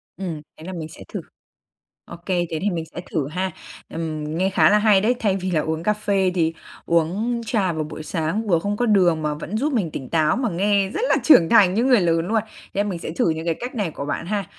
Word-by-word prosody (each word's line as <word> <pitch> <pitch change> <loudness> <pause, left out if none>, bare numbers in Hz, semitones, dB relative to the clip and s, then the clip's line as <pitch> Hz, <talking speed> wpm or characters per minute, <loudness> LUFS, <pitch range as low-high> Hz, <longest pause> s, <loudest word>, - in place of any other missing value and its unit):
Ừm, 170 -5 -5 0.2
thế - - -12
là 185 - -6
mình 160 -3 -5
sẽ - - -12
thử, - - -3 0.8
OK, 170 - -12
thế 175 -4 -1
thì 205 - +1
mình 165 -2 -3
sẽ - - -4
thử 145 -5 -1
ha. 185 +4 -2 0.4
Ừm, 160 -2 -4
nghe 190 +1 +1
khá 160 -4 +4
là 210 - +5
hay 210 -2 +4
đấy, 225 +5 +2
thay 200 -5 +1
vì 185 0 -3
là 160 -4 +2
uống 160 +1 -2
cà 210 - +2
phê 200 -3 +1
thì 165 -3 +1 0.3
uống 190 +9 +1
trà 200 -6 +1
vào 155 -1 -2
buổi 150 +1 -8
sáng 165 +7 -2
vừa 175 -5 +3
không 205 +5 -2
có 245 +2 0
đường 180 -7 +3
mà 150 -1 -1
vẫn 165 +7 -5
giúp 290 +7 0
mình 205 -10 0
tỉnh 135 -4 -6
táo, 160 +4 +2
mà 250 -3 0
nghe 195 +2 +1
rất 415 - -3
là - - +4
trưởng 175 - +6
thành 195 -5 +5
như 230 - +2
người 255 -4 +5
lớn 165 -1 +1
luôn. 220 +2 +1 0.3
Nên 205 +1 0
mình 180 -4 -3
sẽ - - -5
thử 165 +1 +1
những 160 0 -3
cái 165 -1 0
cách 250 +2 -5
này 205 -7 -1
của 140 - -6
bạn 145 +3 -3
ha. 205 +1 -1
180 Hz, 255 wpm, -22 LUFS, 160-210 Hz, 0.8 s, trưởng